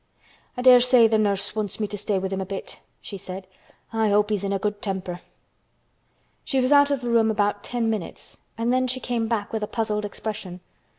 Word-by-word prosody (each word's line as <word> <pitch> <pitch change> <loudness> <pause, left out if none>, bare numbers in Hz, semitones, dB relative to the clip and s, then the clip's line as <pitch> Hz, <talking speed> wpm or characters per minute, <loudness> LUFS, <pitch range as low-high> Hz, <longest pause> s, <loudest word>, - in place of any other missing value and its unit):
"I 250 - -3
dare 250 -1 +9
say 245 -2 +6
th' 220 -1 +2
nurse 200 -1 0
wants 215 -2 -3
me 215 - 0
to 205 0 -5
stay 205 0 -1
with 190 0 -2
him 190 - -2
a - - -3
bit," 195 0 -6 0.2
she 200 - -7
said. 190 0 -8 0.5
"I 220 -1 +2
hope 210 +1 +2
he's 205 -2 0
in 200 - -1
a 200 - +1
good 205 +1 -3
temper." 185 -3 -4 1.2
She 270 - 0
was 255 +2 +1
out 285 0 +6
of 280 -2 0
the 240 - -3
room 225 -1 +4
about 205 -1 0
ten 240 -2 -1
minutes 215 -5 -5 0.2
and 230 +2 0
then 255 0 +2
she 255 +1 -2
came 235 -3 -2
back 220 -3 -2
with 220 - -1
a 210 - -2
puzzled 215 -2 -2
expression. 205 -3 -6
215 Hz, 220 wpm, -24 LUFS, 200-235 Hz, 1.2 s, dare